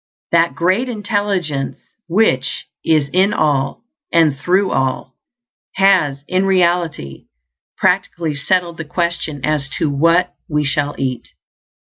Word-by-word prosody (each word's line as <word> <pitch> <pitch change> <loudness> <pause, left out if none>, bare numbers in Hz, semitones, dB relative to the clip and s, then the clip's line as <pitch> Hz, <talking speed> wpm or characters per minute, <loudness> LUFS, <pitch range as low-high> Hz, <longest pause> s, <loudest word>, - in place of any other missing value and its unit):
That 170 0 +3
Great 190 +9 +1
Intelligence, 205 - -2 0.3
which 165 -8 +1 0.2
is 155 -3 +2
in 190 +3 +3
all 140 0 0 0.3
and 160 -4 +4
through 180 +7 +1
all, 130 0 -1 0.6
has 180 -8 +3
in 185 +1 +1
reality 170 - 0 0.5
practically 165 -3 0
settled 170 +4 0
the 165 - -4
question 165 -3 -2
as 150 -2 -1
to 150 - 0
what 165 +5 +2 0.2
we 150 -1 0
shall 145 +1 -1
eat. 130 -3 -3
165 Hz, 115 wpm, -18 LUFS, 140-185 Hz, 0.6 s, and